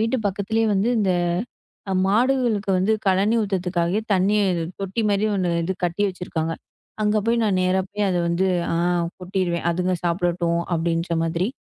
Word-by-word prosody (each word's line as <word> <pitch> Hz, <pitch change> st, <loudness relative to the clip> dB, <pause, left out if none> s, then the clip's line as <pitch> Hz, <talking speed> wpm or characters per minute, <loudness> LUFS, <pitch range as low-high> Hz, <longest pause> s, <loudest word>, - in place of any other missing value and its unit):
வீட்டு 225 Hz, +3 st, +1 dB
பக்கத்துலயே 205 Hz, +3 st, 0 dB
வந்து 195 Hz, +4 st, +1 dB
இந்த 200 Hz, -3 st, +2 dB, 0.8 s
அ -, -, +1 dB
மாடுகளுக்கு 230 Hz, -1 st, +1 dB
வந்து 195 Hz, +4 st, +2 dB
கலனி 195 Hz, +4 st, +3 dB
ஊத்துறதுக்காகவே 185 Hz, -1 st, 0 dB
தண்ணீர் 195 Hz, -1 st, +2 dB, 0.2 s
தொட்டி 195 Hz, +3 st, -2 dB
மாரி 200 Hz, +1 st, +1 dB
1 185 Hz, -3 st, 0 dB
இது 185 Hz, +3 st, -1 dB
கட்டி 175 Hz, +4 st, 0 dB
வச்சுருக்காங்க. 165 Hz, -3 st, -3 dB, 0.5 s
அங்க 210 Hz, 0 st, +2 dB
போய் 235 Hz, +1 st, +2 dB
நான் 200 Hz, -3 st, +1 dB
நேரா 185 Hz, +1 st, +2 dB
போயி 210 Hz, 0 st, -2 dB
அத 180 Hz, -, 0 dB
வந்து 170 Hz, +3 st, +1 dB, 0.3 s
ஆ -, -, 0 dB, 0.4 s
கொட்டிருவேன். 180 Hz, -2 st, -2 dB
அதுங்க 180 Hz, +2 st, 0 dB
சாப்பிடட்டும் 170 Hz, -1 st, 0 dB
அப்பிடின்ற 165 Hz, 0 st, 0 dB
மாதிரி. 165 Hz, +3 st, 0 dB
190 Hz, 150 wpm, -23 LUFS, 175-205 Hz, 0.8 s, கலனி